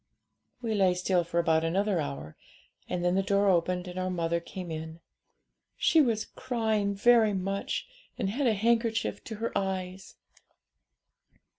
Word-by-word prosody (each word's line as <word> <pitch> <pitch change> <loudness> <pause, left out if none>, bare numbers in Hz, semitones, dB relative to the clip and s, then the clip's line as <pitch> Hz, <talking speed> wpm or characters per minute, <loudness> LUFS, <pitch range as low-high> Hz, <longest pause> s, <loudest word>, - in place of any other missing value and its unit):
'We 225 -2 -1
lay 190 -3 +3
still 180 0 +1
for 170 0 -4
about 160 -1 +2
another 190 +3 +1
hour, 70 +2 -5 0.5
and 175 0 -2
then 175 - +3
the 195 - +3
door 200 +1 +2
opened, 180 0 +1
and 180 +1 -5
our 185 0 -1
mother 170 -1 0
came 175 0 -8
in. 160 +1 -6 0.8
She 320 - +4
was 225 -6 +1
crying 220 -5 -1
very 225 0 +5
much, 195 - -2 0.3
and 225 -6 -1
had 265 +4 0
a 220 - +3
handkerchief 230 +1 0
to 225 - -6
her 230 +2 -4
eyes. 190 -1 -3
190 Hz, 150 wpm, -29 LUFS, 175-220 Hz, 0.8 s, very